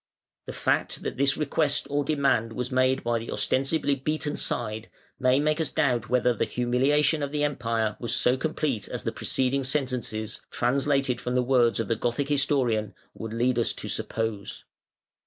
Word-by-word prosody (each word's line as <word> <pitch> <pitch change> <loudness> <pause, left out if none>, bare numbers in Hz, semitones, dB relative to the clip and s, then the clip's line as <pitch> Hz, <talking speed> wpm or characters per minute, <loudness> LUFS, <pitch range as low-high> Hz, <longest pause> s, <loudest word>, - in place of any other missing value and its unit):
The - - -6
fact - - -1
that - - -4
this 135 0 +2
request 150 -1 0
or 145 0 0
demand 135 -6 +1
was 125 +2 -4
made 130 +1 +2
by 120 0 0
the 115 - -8
ostensibly 140 +2 +1
beaten 150 +2 -2
side, 110 +1 -2 0.3
may 130 0 +3
make 155 +2 +1
us 155 - +1
doubt 120 -5 0
whether 125 0 +3
the 115 - -1
humiliation 140 +5 +1
of 140 -1 -2
the 150 0 -1
Empire 115 -6 -1
was 120 0 -2
so 125 - +3
complete 145 -5 -2
as - - -4
the - - -1
preceding 135 +1 0
sentences 125 -6 -2
(translated 135 -1 +1
from 125 0 -2
the 125 - +3
words 120 -3 +3
of 115 - -1
the 115 - +1
Gothic 120 +5 -2
historian) 130 -8 +1 0.2
would 110 -1 -7
lead 120 +2 +1
us 115 - +1
to - - -3
suppose. 110 -3 -3
130 Hz, 175 wpm, -26 LUFS, 115-140 Hz, 0.3 s, may